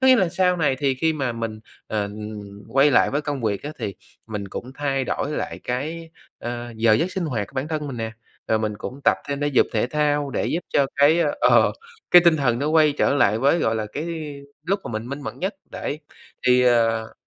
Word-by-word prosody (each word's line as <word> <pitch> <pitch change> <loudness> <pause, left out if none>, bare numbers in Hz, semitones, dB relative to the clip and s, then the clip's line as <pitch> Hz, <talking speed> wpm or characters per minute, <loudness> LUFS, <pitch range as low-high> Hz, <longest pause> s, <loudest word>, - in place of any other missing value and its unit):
có 260 - +3
nghĩa 260 - +8
là 190 -6 +2
sau 180 +1 +2
này 145 -5 +1
thì 135 -2 +1
khi 160 +5 +1
mà 135 -5 -2
mình, 115 -2 -5 0.3
ờ, 105 -1 -1
ừm, 105 -1 -7
quay 135 +5 +4
lại 125 - +4
với 145 - 0
công 145 -3 -3
việc 105 -3 -1
á 150 - -5
thì 100 - -4 0.3
mình 105 -3 -5
cũng 125 +6 -7
thay 135 -2 -1
đổi 140 - -2
lại - - -4
cái, 160 +7 -4 0.3
ờ, 120 0 -5
giờ 110 0 +4
giấc 170 +12 0
sinh 190 - -2
hoạt 115 -10 -2
của - - -20
bản 135 +3 -2
thân 155 -2 -3
mình 135 -3 -5
nè, 110 -1 -4 0.4
rồi 110 - +3
mình 110 -1 -2
cũng 130 +4 -7
tập - - +5
thêm 140 0 -2
thể 145 - +1
dục 140 - +3
thể 110 0 +1
thao 145 0 0
để - - -1
giúp 170 - -1
cho 140 - +2
cái, 145 +4 +5 0.2
ờ, - - +5 0.4
cái 175 - +9
tinh 170 -2 +6
thần 125 -5 +1
nó 145 +3 -1
quay 155 -1 +4
trở - - +3
lại 110 -6 +3
với, 140 +7 +3
gọi 110 -8 +1
là, 110 -1 -2
cái 150 - -3 0.6
lúc 195 +3 +1
mà - - -5
mình 110 +2 -4
minh 140 +2 -5
mẫn - - -6
nhất, 190 +2 -2 0.2
đấy, 150 - -4 0.5
thì, 125 0 +5
ờ 115 -2 +2
135 Hz, 235 wpm, -23 LUFS, 115-150 Hz, 0.6 s, cái